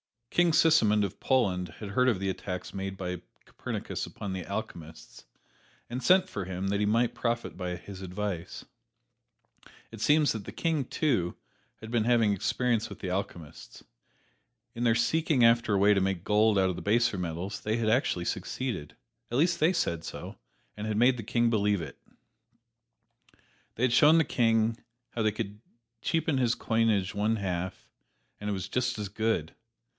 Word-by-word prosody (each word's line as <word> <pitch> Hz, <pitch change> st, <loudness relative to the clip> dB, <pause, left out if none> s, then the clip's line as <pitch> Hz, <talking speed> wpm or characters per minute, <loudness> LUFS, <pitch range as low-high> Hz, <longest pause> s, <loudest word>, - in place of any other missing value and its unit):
King 175 Hz, -2 st, +3 dB
Sigismund 110 Hz, -12 st, +4 dB
of 100 Hz, -, -4 dB
Poland 90 Hz, -, +1 dB
had 105 Hz, -, -6 dB
heard 125 Hz, +5 st, +2 dB
of 110 Hz, -7 st, 0 dB
the 95 Hz, 0 st, -1 dB
attacks 90 Hz, -1 st, -5 dB
made 95 Hz, 0 st, -4 dB
by 90 Hz, -2 st, -4 dB, 0.2 s
Copernicus -, -, -5 dB
upon 100 Hz, -2 st, -6 dB
the 90 Hz, -2 st, -5 dB
alchemists, 85 Hz, -7 st, -7 dB, 0.6 s
and 125 Hz, +2 st, -4 dB
sent 185 Hz, +9 st, +5 dB
for 100 Hz, -3 st, -5 dB
him 95 Hz, +1 st, -3 dB
that 100 Hz, 0 st, 0 dB
he 105 Hz, -, +2 dB
might 115 Hz, +3 st, +2 dB
profit 120 Hz, 0 st, -2 dB
by 90 Hz, -1 st, -3 dB
his 95 Hz, +2 st, -10 dB
advice, 95 Hz, -2 st, -5 dB, 1.0 s
for -, -, -20 dB, 0.2 s
it 110 Hz, -2 st, -9 dB
seems 150 Hz, +2 st, +4 dB
that 110 Hz, -3 st, -5 dB
the -, -, -7 dB
King, 160 Hz, -5 st, 0 dB
too, 120 Hz, -, 0 dB, 0.5 s
had 110 Hz, 0 st, -8 dB
been 115 Hz, -2 st, +1 dB
having 115 Hz, -4 st, +3 dB
experience 115 Hz, +3 st, 0 dB
with 100 Hz, -, -11 dB
alchemists. 90 Hz, -4 st, -5 dB, 0.9 s
In 120 Hz, +1 st, -2 dB
their 115 Hz, -1 st, +4 dB
seeking 150 Hz, +2 st, +2 dB
after 115 Hz, -1 st, +4 dB
a -, -, +3 dB
way 100 Hz, +2 st, +5 dB
to 100 Hz, -, +2 dB
make 95 Hz, -2 st, -1 dB
gold 105 Hz, +1 st, +3 dB
out 95 Hz, -1 st, +3 dB
of 90 Hz, -, -3 dB
the -, -, -5 dB
baser 110 Hz, 0 st, +2 dB
metals 90 Hz, +3 st, -4 dB
they 110 Hz, +1 st, -1 dB
had 115 Hz, -2 st, 0 dB
actually 110 Hz, -7 st, +1 dB
succeeded. 115 Hz, -, -4 dB, 0.3 s
At 120 Hz, -, -1 dB
least 170 Hz, +3 st, +2 dB
they 160 Hz, +4 st, +4 dB
said 85 Hz, -, -1 dB
so, -, -, -8 dB, 0.4 s
and 105 Hz, +1 st, -5 dB
had 105 Hz, -1 st, -1 dB
made 125 Hz, +2 st, +4 dB
the 115 Hz, -, -5 dB
King 120 Hz, +1 st, +1 dB
believe 105 Hz, -3 st, +2 dB
it. 70 Hz, -3 st, -8 dB, 1.8 s
They 115 Hz, -, -3 dB
had 125 Hz, -2 st, +3 dB
shown 150 Hz, +5 st, +6 dB
the 165 Hz, -, +5 dB
King 115 Hz, -3 st, +2 dB, 0.3 s
how 115 Hz, -, -2 dB
he 110 Hz, -, +3 dB
could 105 Hz, -1 st, -5 dB, 0.4 s
cheapen 160 Hz, -4 st, 0 dB
his 125 Hz, -2 st, +2 dB
coinage 110 Hz, -4 st, +1 dB
one 105 Hz, +2 st, +1 dB
half, 95 Hz, -3 st, -4 dB, 0.5 s
and 105 Hz, -, -4 dB
"it -, -, 0 dB
was 95 Hz, 0 st, -4 dB
just 125 Hz, -1 st, -1 dB
as 105 Hz, -2 st, -4 dB
good!" 110 Hz, -6 st, -1 dB
105 Hz, 175 wpm, -29 LUFS, 95-120 Hz, 1.8 s, shown